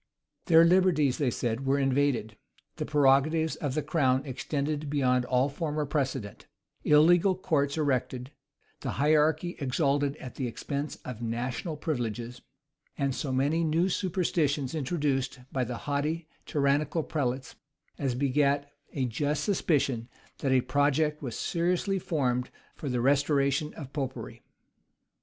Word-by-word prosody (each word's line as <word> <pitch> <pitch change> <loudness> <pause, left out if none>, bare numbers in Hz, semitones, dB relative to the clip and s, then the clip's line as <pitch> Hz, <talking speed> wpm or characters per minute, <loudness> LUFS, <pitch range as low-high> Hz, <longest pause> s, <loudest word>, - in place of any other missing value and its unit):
Their 165 -2 +7
liberties, 170 -7 +3
they 140 -4 +2
said, 120 +2 -2
were 135 +1 +3
invaded; 135 -5 +1 0.4
the - - -3
prerogatives 150 +2 +3
of 145 -3 -3
the 155 - 0
crown 130 -5 +1
extended 145 +2 -3
beyond 125 -3 +2
all 125 +2 +2
former 150 0 -2
precedent; 135 -7 -3 0.4
illegal 170 +5 +5
courts 145 -5 0
erected; 130 -3 -1 0.5
the - - -4
hierarchy 155 +3 +2
exalted 140 0 +1
at 130 -4 -9
the 130 - -1
expense 140 +4 -4
of 120 -3 -6
national 125 +7 -3
privileges; 120 -5 -3 0.6
and 140 -2 0
so 135 +1 -3
many 145 +6 +1
new 165 +4 +2
superstitions 165 -7 0
introduced 140 -4 -1
by 130 - 0
the 120 0 -4
haughty, 150 +3 -1 0.2
tyrannical 145 +2 +1
prelates, 130 -4 -2 0.4
as 135 -4 -1
begat 140 +1 +1 0.2
a 135 -3 0
just 145 +5 -1
suspicion 140 - 0 0.3
that 135 - 0
a 130 -1 +4
project 145 +3 +1
was 125 -6 -5
seriously 180 +3 0
formed 125 -8 -1 0.3
for 145 - -5
the 125 -1 0
restoration 140 +2 +2
of 140 -4 -9
Popery. 125 -5 -5
140 Hz, 130 wpm, -28 LUFS, 130-155 Hz, 0.6 s, Their